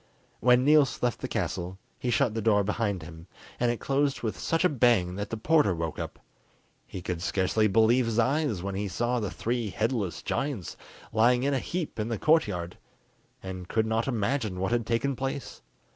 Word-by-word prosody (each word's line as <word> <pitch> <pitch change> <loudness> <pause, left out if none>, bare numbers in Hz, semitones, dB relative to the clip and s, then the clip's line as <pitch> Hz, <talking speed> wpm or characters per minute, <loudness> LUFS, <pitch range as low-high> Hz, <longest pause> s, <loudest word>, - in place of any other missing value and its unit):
When 125 +1 +4
Niels 150 -4 +4
left 120 -3 +1
the - - -2
castle, 90 +2 -3 0.2
he 125 - -2
shut 120 -1 +2
the 115 - -2
door 105 -2 +3
behind 100 -3 -1
him, 80 +1 -11 0.3
and 120 - +2
it 120 - -1
closed 140 -1 0
with 110 - -1
such 165 +2 +1
a - - +8
bang 115 -10 +3
that 100 +1 -4
the 115 - -3
porter 150 - +3
woke 80 -1 -4
up. - - -5 0.7
He 90 - -7
could 90 -2 -3
scarcely 95 +4 +1
believe 115 +4 +4
his 115 -1 -1
eyes 130 - +1
when 100 0 -3
he 100 +2 -2
saw 120 +6 -1
the 105 -4 -2
three 115 +1 -2
headless 110 -3 -2
giants 135 - -3 0.4
lying 120 +3 +4
in 140 +1 +1
a 135 - +1
heap 170 -6 -4
in 105 - -1
the 115 -2 -2
courtyard, 100 - +1 0.6
and 95 -1 -6
could 110 +2 +1
not 110 +2 0
imagine 110 -4 -1
what 95 +3 -1
had 120 -1 0
taken 130 +4 0
place. 135 +1 -5
115 Hz, 190 wpm, -28 LUFS, 100-130 Hz, 0.7 s, a